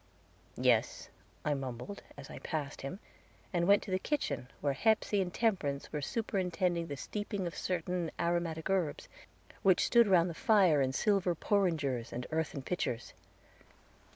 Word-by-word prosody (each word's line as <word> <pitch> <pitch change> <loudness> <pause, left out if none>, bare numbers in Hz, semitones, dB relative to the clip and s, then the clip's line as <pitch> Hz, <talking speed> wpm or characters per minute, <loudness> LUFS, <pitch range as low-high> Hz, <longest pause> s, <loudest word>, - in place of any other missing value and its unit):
"Yes," - - +2 0.4
I 150 - +2
mumbled, 135 - -5 0.2
as - - -9
I - - -8
passed 145 -4 -4
him, 140 +8 -5 0.5
and 175 -1 +1
went 200 0 +5
to 195 - -7
the 185 - +1
kitchen, 140 - -2
where 140 -1 0
Hepsey 215 +4 +2
and 180 -1 -2
Temperance 175 -12 0
were 150 - -1
superintending 180 -2 -1
the 140 -2 -5
steeping 205 +3 -4
of 170 - -3
certain 180 -1 -2
aromatic 170 -2 0
herbs, 180 -6 0 0.5
which 190 -2 +4
stood 235 -2 +5
round 180 -3 +5
the 170 - -4
fire 190 - +4
in 130 -1 +1
silver 190 +2 +2
porringers 155 - 0
and 125 +1 -4
earthen 155 -3 -2
pitchers. 125 -8 -3
175 Hz, 150 wpm, -32 LUFS, 145-195 Hz, 0.5 s, went